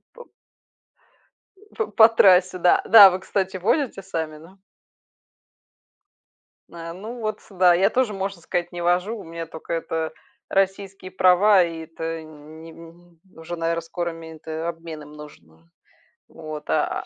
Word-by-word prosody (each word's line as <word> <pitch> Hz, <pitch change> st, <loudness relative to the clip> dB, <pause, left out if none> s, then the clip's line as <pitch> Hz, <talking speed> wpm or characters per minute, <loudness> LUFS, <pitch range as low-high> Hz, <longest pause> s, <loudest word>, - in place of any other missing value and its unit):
По 485 Hz, -, -12 dB, 1.5 s
П 220 Hz, -, -1 dB
по 220 Hz, +1 st, +6 dB
трассе 185 Hz, -4 st, +4 dB
да. 175 Hz, -, +4 dB
Да, 215 Hz, -2 st, +9 dB
а 195 Hz, -, +9 dB
вы, 185 Hz, -, -3 dB
кстати, 190 Hz, 0 st, -3 dB
водите 220 Hz, -, -1 dB
сами, 160 Hz, -5 st, -5 dB
да? 175 Hz, +5 st, -17 dB, 2.1 s
А, 165 Hz, 0 st, -8 dB
ну, 220 Hz, +7 st, -9 dB
вот 215 Hz, -1 st, -4 dB
сюда. 180 Hz, -3 st, +3 dB
Я 190 Hz, +3 st, +3 dB
тоже, 250 Hz, -3 st, 0 dB
можно 195 Hz, -2 st, -5 dB
сказать, 175 Hz, +1 st, -3 dB
не 175 Hz, 0 st, -6 dB
вожу, 180 Hz, +6 st, 0 dB
у 205 Hz, -, -10 dB
меня 165 Hz, 0 st, -7 dB
тока 160 Hz, +1 st, -8 dB
это 165 Hz, -1 st, -3 dB, 0.4 s
российские 195 Hz, -1 st, -2 dB
права, 185 Hz, +2 st, +4 dB
и 165 Hz, -1 st, -5 dB
это 165 Hz, 0 st, -6 dB
не 155 Hz, +1 st, -13 dB
м, 170 Hz, +1 st, -17 dB, 0.2 s
уже, 165 Hz, +2 st, -7 dB
наверно, 165 Hz, 0 st, -2 dB
скоро 170 Hz, +1 st, -4 dB
мен 165 Hz, -1 st, -11 dB
т 160 Hz, +1 st, -6 dB
обмен 165 Hz, -2 st, -6 dB
им 150 Hz, 0 st, -14 dB
нужен 150 Hz, -, -13 dB
уже. 80 Hz, +1 st, -26 dB, 0.6 s
Вот 155 Hz, -1 st, -9 dB
а, -, -, -1 dB
175 Hz, 150 wpm, -23 LUFS, 165-195 Hz, 2.1 s, Да